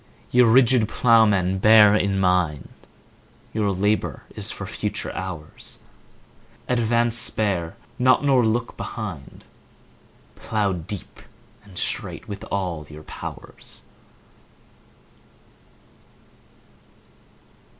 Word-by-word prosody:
Ye 125 - +5
rigid 120 -1 +5
Ploughmen, 105 -6 +3
bear 105 0 +7
in 100 -2 +1
mind 90 -7 +1 0.8
Your 105 -2 0
labour 105 +3 -1
is - - -4
for - - -6
future - - -3
hours: 90 -5 -7 0.9
Advance—spare 115 -6 0 0.2
not—nor 130 +1 +4
look 115 +2 -1
behind— 100 - -7 0.9
15 - - -19
Plough 105 -3 +1
deep 90 +3 -7 0.4
and 100 -3 -15
straight 105 -3 -3
with 100 -2 -7
all 90 -6 -3
your 75 0 -11
powers! - - -9
105 Hz, 85 wpm, -23 LUFS, 90-115 Hz, 0.9 s, bear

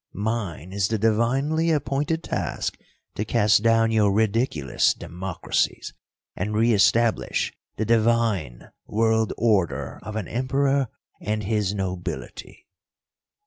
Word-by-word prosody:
Mine 100 -5 -3
is 100 -1 +1
the 110 - -1
divinely 130 +9 +1
appointed 150 +1 0
task - - -3 0.4
to 105 - -2
cast 110 -2 +3
down 115 0 +3
your 105 -3 +3
ridiculous 105 - +1
democracies 90 +1 -3 0.4
and 105 +3 -3
re 115 +2 +3
establish 115 +3 +2 0.2
the 110 - -2
divine 110 - +1 0.2
world 110 0 +1
order 105 -7 0
of 110 - -7
an 110 -4 -3
Emperor 135 +2 +1 0.3
and 105 0 -2
his 105 -1 0
nobility. 90 -2 -5
110 Hz, 110 wpm, -24 LUFS, 100-115 Hz, 0.4 s, cast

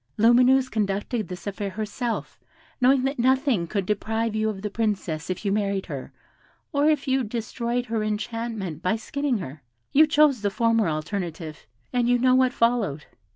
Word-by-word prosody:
Lumineuse 250 +4 +5
conducted 210 +1 -2
this 180 -1 -8
affair 200 0 -3
herself, 220 +4 -4 0.4
knowing 255 +1 +4
that 270 0 -1
nothing 260 - +2
could 200 +1 -2
deprive 220 +2 -1
you 215 0 +1
of 200 -2 -6
the 210 - -2
Princess 195 -7 -2
if 185 +3 -4
you 200 - +1
married 200 -1 0
her, 140 -3 -7 0.6
or 290 0 +3
if 300 -3 0
you 265 0 +2
destroyed 235 +2 -3
her 225 -2 -2
enchantment 215 -5 -3
by 185 +3 +1
skinning 275 +3 -2
her. 155 -6 -7 0.3
You 310 +3 +6
chose 300 -5 +4
the 205 - +1
former 230 -2 +2
alternative, 160 -1 -5 0.3
and 245 -1 +2
you 245 - +4
know 255 +1 +3
what 255 0 +4
followed. 225 - 0
220 Hz, 165 wpm, -25 LUFS, 195-250 Hz, 0.6 s, You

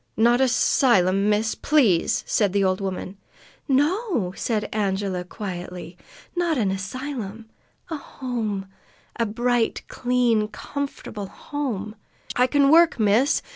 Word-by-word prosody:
"Not 240 +3 +4
a 265 - +5
'sylum, 205 -5 +3
miss, 215 +1 +1
please!" 235 - +2
said 205 -4 +1
the 200 -1 +2
old 185 0 +1
woman. 190 0 -4 0.5
"No," 290 - +1
said 220 -3 -1
Angela 195 -3 -1
quietly. 180 -2 -7 0.4
"Not 345 -3 +1
an 205 -5 +1
asylum, 225 +2 -5 0.5
A 320 - -2
home 230 -8 -4 0.5
a 230 - +1
bright, 240 +2 0
clean, 245 -4 +1
comfortable 215 -2 -6
home 220 -6 -4 0.2
" - - -11
"I 250 +1 +4
can 280 0 +3
work, 335 -4 +5
miss!" 220 +7 +3
220 Hz, 125 wpm, -24 LUFS, 195-260 Hz, 0.5 s, a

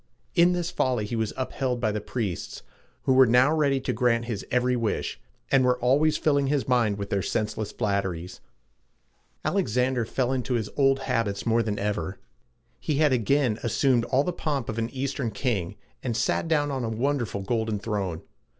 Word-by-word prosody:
In 175 0 +5
this 175 0 -2
folly 125 -10 0
he 110 - -4
was 110 -2 -1
upheld 130 -1 -2
by 110 -3 +1
the 105 0 -3
priests, 105 -7 -4 0.4
who 130 - +3
were 130 -1 +7
now 125 +5 +5
ready 140 -4 +2
to - - -1
grant 120 -2 +1
his 115 -4 -4
every 125 0 +2
wish, 115 -3 -2 0.3
and 135 -1 +5
were 125 0 +3
always 140 +6 +3
filling 140 -2 +2
his 140 -1 0
mind 120 -5 +2
with 100 -1 -5
their 100 - +1
senseless 105 +1 -2
flatteries. 95 -4 -2 1.0
Alexander 125 +2 +1
then 110 - -10
fell 130 -1 0
into 130 -1 -1
his 110 -3 -2
old 135 -1 +3
habits 115 -6 -1
more 115 0 +3
than 105 -2 -2
ever. 100 -2 -2 0.6
He 150 - -1
had 150 -1 +3
again 125 -1 +2
assumed 120 +1 +2
all 130 +3 +2
the 180 - -2
pomp 145 -7 -2
of 110 +1 -3
an 115 0 -1
Eastern 135 -2 -2
king, 100 -4 -2 0.3
and 120 -3 -2
sat 145 +7 0
on 145 -2 +2
a 115 - -1
wonderful 120 -3 -1
golden 110 0 -1
throne. 100 -5 -3
120 Hz, 180 wpm, -26 LUFS, 105-135 Hz, 1.0 s, were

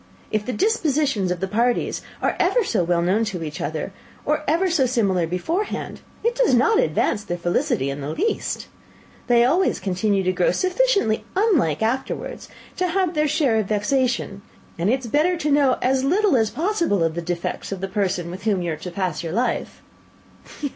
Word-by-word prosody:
If 215 0 -1
the - - 0
dispositions 290 - +1
of 180 -1 -2
the 190 - 0
parties 235 +5 0 0.2
are - - +1
ever - - +3
so 215 - 0
well 170 0 +1
known 195 +6 +2
to 185 -6 -4
each 155 +3 -6
other, 160 +3 -3 0.3
or 305 +1 0
ever 335 +5 +2
so 315 -7 +2
similar 195 -9 +1
beforehand, 320 - -3 0.2
it 470 +1 +2
does - - +3
not 420 - +4
advance 210 - +1
their 175 -4 -4
felicity 170 -5 0
in 140 +1 -6
the 140 - -4
least. 400 - -2 0.6
They 240 -1 +5
always 350 +9 +2
continue 195 +1 0
to 185 - +2
grow - - +2
sufficiently 380 - +1
unlike 315 - +2
afterwards 255 +4 -3 0.3
to 365 - +1
have 365 0 0
their 305 -1 +1
share 285 -6 +2
of 210 - -1
vexation; 215 -1 0 0.4
and 175 +4 +1
it 260 +3 +1
is - - -8
better 315 +9 +2
to 300 -2 -1
know 280 -3 +4
as 260 +1 +2
little 375 +4 +3
as 220 -3 +2
possible 335 - 0
of 165 -1 0
the 170 - -3
defects 170 +2 -4
of 195 - -3
the 195 - -3
person 185 -3 -1
with 190 +3 -9
whom 200 -5 +1
you 170 - -1
are 155 - -3
to 180 - -7
pass 180 -3 -2
your 165 -1 -5
life." 235 +3 -2
230 Hz, 190 wpm, -22 LUFS, -, 0.6 s, They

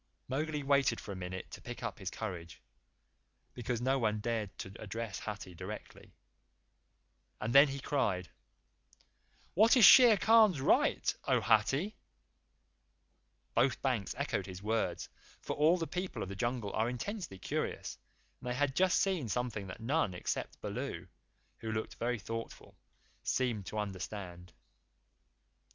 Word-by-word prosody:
Mowgli 150 +2 -2
waited 135 -4 +3
for - - -8
a - - -5
minute 95 0 -6
to - - -9
pick 120 0 -8
up 115 -2 -4
his 95 -2 -3
courage, 90 -7 -6 0.9
because 120 -1 -3
no 135 +2 +2
one 110 -3 +1
cared 110 -2 -2
to 95 - -7
address 110 -1 -5
Hathi 105 -3 -6
directly, 95 +5 -9 1.2
and 110 +3 -2
then 140 +2 +9
he 140 0 -4
cried: 105 - 0 1.3
"What 220 +7 +6
is 230 - +9
Shere 245 -5 +9
Khan's 220 -7 +5
right, 130 - +3
O - - +3
Hathi?" 135 - +2 1.6
Both 130 +3 +2
banks 125 -7 0
echoed 110 -9 -2
his 95 0 -8
words, 110 +1 -1 0.3
for - - -4
all 155 +4 +4
the 165 - -2
People 180 +3 -4
of 95 - -6
the 100 - -6
Jungle 120 -1 -2
are 110 +2 +1
intensely 165 - -5
curious, 95 - -3 0.4
and 125 - -6
they 125 - -1
had 140 0 0
just 185 0 +4
seen 180 - 0
something 110 -3 -2
that 95 - -8
none 120 - 0
except 90 - -4
Baloo, - - -5 0.5
who 110 - -4
looked 110 0 -3
very 120 +1 -1
thoughtful, 115 +3 -7 0.5
seemed 115 -7 -1
to 110 - -5
understand. 95 -3 -5
115 Hz, 140 wpm, -33 LUFS, 100-140 Hz, 1.6 s, then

